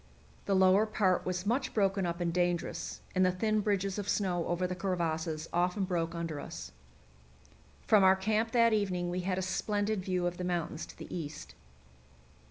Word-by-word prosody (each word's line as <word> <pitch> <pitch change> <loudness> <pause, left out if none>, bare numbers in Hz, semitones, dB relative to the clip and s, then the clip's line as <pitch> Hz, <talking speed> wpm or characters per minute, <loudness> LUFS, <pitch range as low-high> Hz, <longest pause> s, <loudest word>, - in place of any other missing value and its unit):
The 195 - +1
lower 190 +3 +5
part 190 -5 +1
was 180 0 -2
much 255 +5 0
broken 195 -3 +2
up 170 +1 -3
and 170 -1 -1
dangerous, 175 -1 -1
and 185 - +3
the 185 - +4
thin 215 +4 0
bridges 200 -1 0
of 205 0 -4
snow 180 -4 0
over 175 +1 0
the 180 - -2
crevasses 165 -4 -2
often 180 +3 +1
broke 170 -3 -1
under 165 -3 -3
us. - - -7 1.1
From 210 -3 +5
our 190 0 +7
camp 215 +4 0
that 230 -2 +5
evening 180 -4 0
we 180 - -2
had 185 0 -1
a 190 - -1
splendid 205 +1 -1
view 180 -1 -1
of 175 0 -2
the 180 - -4
mountains 175 -3 -2
to - - -13
the - - -7
east. 155 -4 -6
185 Hz, 180 wpm, -31 LUFS, 175-200 Hz, 1.1 s, our